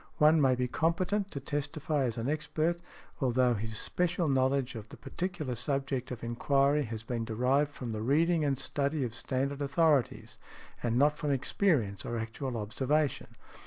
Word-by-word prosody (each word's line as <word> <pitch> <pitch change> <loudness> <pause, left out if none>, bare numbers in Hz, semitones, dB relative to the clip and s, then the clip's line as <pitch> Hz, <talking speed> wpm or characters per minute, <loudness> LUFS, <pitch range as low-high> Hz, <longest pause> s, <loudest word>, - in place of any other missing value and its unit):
One 155 +1 +5
may 130 -2 +4
be 125 0 0
competent 185 +8 0
to 140 - -5
testify 145 0 -2
as 120 -2 -2
an 115 +2 -2
expert, 155 +3 0 0.4
although 125 -2 +3
his 110 0 -4
special 180 +3 0
knowledge 135 -1 +1
of 110 -2 -8
the - - -11
particular 155 - -4
subject 135 +1 -2
of 125 -3 -6
enquiry 140 +4 +2
has 110 -1 -6
been 115 0 -3
derived 125 +6 +1
from 125 -5 -6
the 110 -1 -3
reading 160 +7 +2
and 140 -2 +1
study 140 +2 -1
of 120 -3 -3
standard 135 +4 -2
authorities, 145 -2 +1 0.4
and 120 -1 0
not 150 +3 +4
from 150 - -1
experience 135 - +1
or 120 - -3
actual 115 +3 -4
observation. 135 +7 0
135 Hz, 165 wpm, -31 LUFS, 120-150 Hz, 0.4 s, One